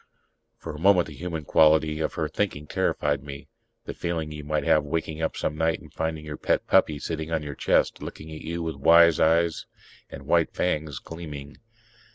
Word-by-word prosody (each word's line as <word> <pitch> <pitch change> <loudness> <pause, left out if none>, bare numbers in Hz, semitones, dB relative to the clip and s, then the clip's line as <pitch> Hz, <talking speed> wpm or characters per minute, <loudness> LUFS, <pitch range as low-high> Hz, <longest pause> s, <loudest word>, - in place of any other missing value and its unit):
For - - -7
a 75 - -8
moment 90 0 +5
the - - -10
human 85 -3 -5
quality 80 0 +4
of 80 - -2
her 80 - -1
thinking 75 -3 -2
terrified 75 -1 0
me... 70 -1 -10 0.4
the - - -5
feeling 80 -3 -3
you 75 -1 -7
might 75 +1 -1
have 75 - +3
waking 80 +1 -3
up 80 - -2
some 75 - -2
night 80 +1 0
and - - -16
finding 80 -1 -3
your 75 -1 -6
pet - - 0
puppy 75 - +3
sitting 80 +1 -5
on 80 -2 -1
your 75 -1 -5
chest, - - +1
looking 80 +1 -8
at 80 - -8
you 85 +1 -4
with 80 -3 -4
wise 85 +3 +6
eyes 85 +1 +2 0.4
and 70 0 -10
white 85 +2 +2
fangs 75 -5 -1
gleaming 75 -4 -9
80 Hz, 195 wpm, -25 LUFS, 75-80 Hz, 0.4 s, wise